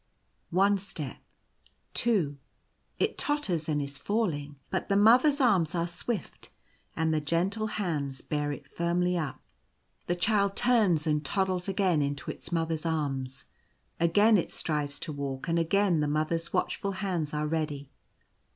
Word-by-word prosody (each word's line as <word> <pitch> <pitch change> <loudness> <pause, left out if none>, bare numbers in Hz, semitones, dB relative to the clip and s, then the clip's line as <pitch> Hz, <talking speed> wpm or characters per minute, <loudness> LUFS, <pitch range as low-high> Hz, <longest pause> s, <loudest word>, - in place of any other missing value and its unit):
One 195 +3 +3
step 155 - -5 0.4
— - - -35
two 175 -12 +2 0.3
— - - -42
it - - 0
totters, 195 - 0
and 150 -1 +1
is 140 0 -5
falling; 150 -7 -1 0.2
but 185 - -2
the 200 - +3
Mother's 250 +8 +6
arms 185 - +3
are 170 -1 +1
swift, 180 +4 -5 0.5
and 160 -1 +1
the 155 - +1
gentle 185 +8 0
hands 150 -11 -2
bear 150 -1 -2
it 145 - -7
firmly 175 +1 0
up. 155 -5 -3 0.7
The 175 - +1
Child 200 +1 +2
turns 210 -11 +3
and 150 -1 +1
toddles 185 +3 -1
again 185 -5 +2
into 140 -1 -2
its - - -10
Mother's 165 -2 -1
arms. 135 -5 -2 0.5
Again 205 +6 +5
it - - -3
strives 145 -2 -2
to 160 - -4
walk; 140 +1 -4
and 170 0 +2
again 180 +1 +2
the 150 - +1
Mother's 155 +3 -1
watch - - 0
ful 200 0 -3
hands 180 -6 -2
are 150 0 -1
ready. 150 -3 -3
170 Hz, 155 wpm, -29 LUFS, 150-195 Hz, 0.7 s, Mother's